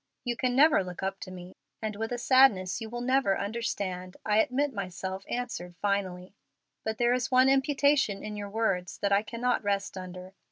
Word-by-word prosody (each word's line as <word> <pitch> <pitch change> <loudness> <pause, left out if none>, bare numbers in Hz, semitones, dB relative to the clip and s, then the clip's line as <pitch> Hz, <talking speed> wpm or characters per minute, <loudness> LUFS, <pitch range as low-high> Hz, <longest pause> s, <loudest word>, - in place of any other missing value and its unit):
You 245 -1 -1
can 250 +1 0
never 290 -5 +5
look 180 0 -7
up 195 0 -2
to 185 - -8
me, 180 0 -10 0.3
and 215 -1 -3
with 225 +2 -4
a 245 - -1
sadness 240 -7 +4
you 220 - -5
will 240 +1 -5
never 255 -5 +2
understand, 195 -4 -3
I 210 0 +3
admit 270 +5 +1
myself 190 0 -5
answered 205 -8 -4
finally. 190 -2 -2 0.5
But 220 0 -2
there 240 0 +3
is 250 0 0
one 255 +1 +5
imputation 275 -5 +2
in 210 0 -5
your 205 -1 -5
words 195 -5 -1
that 200 - -1
I 200 +1 +4
cannot 240 +3 -1
rest 200 -1 -1
under. 185 0 -9
210 Hz, 190 wpm, -29 LUFS, 190-245 Hz, 0.5 s, never